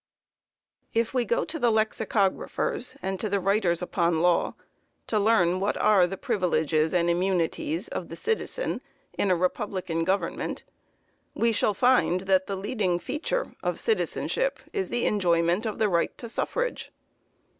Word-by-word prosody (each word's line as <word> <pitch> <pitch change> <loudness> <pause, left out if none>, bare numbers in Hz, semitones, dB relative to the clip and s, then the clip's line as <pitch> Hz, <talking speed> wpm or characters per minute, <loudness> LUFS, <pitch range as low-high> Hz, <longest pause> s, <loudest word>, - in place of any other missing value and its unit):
_ - - -68 1.0
If 230 +2 -1
we 250 -2 +1
go 235 - +1
to 320 0 -5
the 240 -3 +3
lexicographers 220 +1 0
and 190 0 -2
to 215 - -2
the 200 0 +1
writers 190 -3 +1
upon 170 -2 +1
law, 175 -1 +2 0.5
to 215 - 0
learn 185 -4 +3
what 200 +2 0
are 195 -4 +4
the 195 - -5
privileges 160 - +1
and 175 -1 +2
immunities 185 - 0
of - - -5
the - - -6
"citizen" 455 +2 -2 0.3
in 200 - 0
a 185 - +4
republican 180 -1 -1
government, 190 +4 -2 0.7
we 230 0 +2
shall 210 -1 +1
find 245 -7 +3
that 190 -1 +2
the 200 - -2
leading 195 -3 0
feature 320 - -2
of - - -2
citizenship - - 0 0.2
is 395 -2 -2
the 240 - -1
enjoyment 175 +1 +2
of 215 - -4
the 220 - +2
right 170 +5 -1
of 235 - -5
suffrage. - - -2
195 Hz, 155 wpm, -26 LUFS, 180-235 Hz, 1.0 s, are